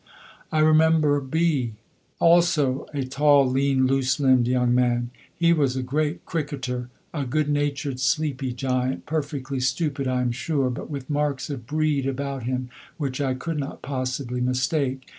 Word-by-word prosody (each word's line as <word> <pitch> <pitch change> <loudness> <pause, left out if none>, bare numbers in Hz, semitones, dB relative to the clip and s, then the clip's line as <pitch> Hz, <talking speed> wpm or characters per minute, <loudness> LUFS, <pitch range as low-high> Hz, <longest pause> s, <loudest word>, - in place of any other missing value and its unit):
I 155 - +2
remember 155 -1 +4
B 140 -4 0 0.4
also, 165 -6 +3
a 140 -3 -2
tall, 140 +1 +4
lean, 135 0 +2
loose 130 +1 +1
limbed 130 -3 +4
young 125 -1 +2
man. 120 -1 +1 0.3
He 170 0 +4
was 140 -5 +1
a 130 - -2
great 150 +5 -1
cricketer, 130 -6 -3 0.2
a 145 -3 -2
good 145 +3 0
natured, 145 -2 -1
sleepy 135 0 0
giant, 130 +1 -1
perfectly 145 -3 -3
stupid 135 +2 -1
(I 130 0 +1
am 125 -1 0
sure) 135 +1 -1
but 125 - -6
with 140 -3 -6
marks 145 -1 -1
of 120 -5 -6
breed 150 -2 0
about 135 0 -3
him 125 0 -3 0.3
which 140 -3 -3
I 130 -2 0
could 150 +4 -3
not 140 - -6
possibly 130 -2 -3
mistake. 130 +1 0
135 Hz, 155 wpm, -24 LUFS, 130-150 Hz, 0.4 s, remember